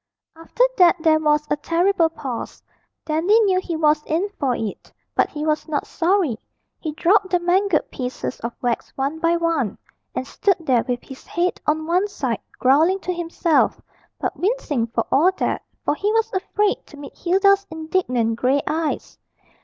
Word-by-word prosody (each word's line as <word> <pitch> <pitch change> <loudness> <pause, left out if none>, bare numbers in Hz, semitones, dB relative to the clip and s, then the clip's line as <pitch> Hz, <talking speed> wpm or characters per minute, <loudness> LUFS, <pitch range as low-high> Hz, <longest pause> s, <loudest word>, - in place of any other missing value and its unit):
After 330 +9 -1 0.2
that 355 -1 +7
there 315 -2 +5
was 300 -1 +2
a - - +4
terrible 335 +2 +2
pause. 265 -7 -6 0.4
Dandy 335 +8 +3
knew 380 -4 +3
he 350 -3 -4
was 305 -1 +3
in 340 +6 0
for 260 -4 +1
it, 220 -4 -5 0.2
but - - +2
he 300 0 -5
was 305 +1 0
not 300 -2 -2
sorry. 340 - +1 0.4
He 310 -2 -4
dropped 375 +5 +3
the 355 -1 +2
mangled 360 0 +1
pieces 250 0 -4
of 235 - -4
wax 240 -1 -1
one 280 +4 -2
by 335 +1 +2
one, 330 - 0 0.4
and 260 - -2
stood 390 +7 +1
there 260 -8 +2
with 245 -1 -2
his 265 - -12
head 355 +1 -1
on 310 +1 +1
one 360 +5 +2
side, 260 - -3 0.2
growling 310 +9 +4
to 365 - -2
himself, 340 -1 +1 0.4
but - - -2
wincing 350 - -1
for 230 0 -2
all 330 +7 +5
that, - - -1 0.2
for - - +2
he 405 +7 -1
was 450 0 +1
afraid 400 +2 0
to 295 - -14
meet 285 0 -10
Hilda's 395 +2 +3
indignant 315 - -1
grey 265 +4 +2
eyes. 315 0 -3
320 Hz, 170 wpm, -22 LUFS, 280-370 Hz, 0.4 s, that